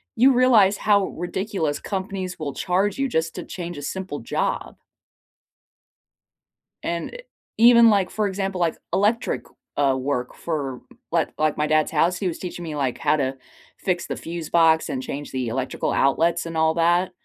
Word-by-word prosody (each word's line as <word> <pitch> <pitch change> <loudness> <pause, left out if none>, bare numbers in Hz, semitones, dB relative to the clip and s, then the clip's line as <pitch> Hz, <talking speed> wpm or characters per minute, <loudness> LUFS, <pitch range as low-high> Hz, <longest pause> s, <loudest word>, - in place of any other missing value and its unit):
you 260 +4 +5
realize 225 -6 +5
how 200 -2 +3
ridiculous 175 -3 -3
companies 190 -2 -4
will 145 -3 -4
charge 190 - 0
you 275 0 +1
just 165 -7 -1
to - - -5
change 175 -3 -6
a 145 - -6
simple 180 0 -4
job. 115 - -2 2.1
And, 170 0 -3
eh, - - -7 0.4
even, 235 0 +7
like, 200 -4 +2
for 215 -1 -1
example, 195 -1 -3
like, 170 -2 +1 0.2
electric, 215 +4 +1 0.3
uh, 140 -2 +3
work 130 -2 -2
for 140 -6 -4 0.3
like - - 0
like 155 -1 +1
my 150 - +1
dad's 155 0 +2
house, 165 +3 +2
he 190 - -2
was 165 - -6
teaching 175 -1 -6
me, 160 -3 -5
like, 135 -4 -1
how - - +2
to 135 -2 -1 0.4
fix 175 -2 -2
the - - -3
fuse 165 -2 -6
box, 165 -1 +4
and 130 -1 -3
change 145 +2 -6
the 130 -2 -2
electrical 130 +3 -2
outlets, 165 +5 +2
and 165 -1 -5
all 160 0 +3
that, 175 +2 +2
170 Hz, 170 wpm, -23 LUFS, 150-195 Hz, 2.1 s, even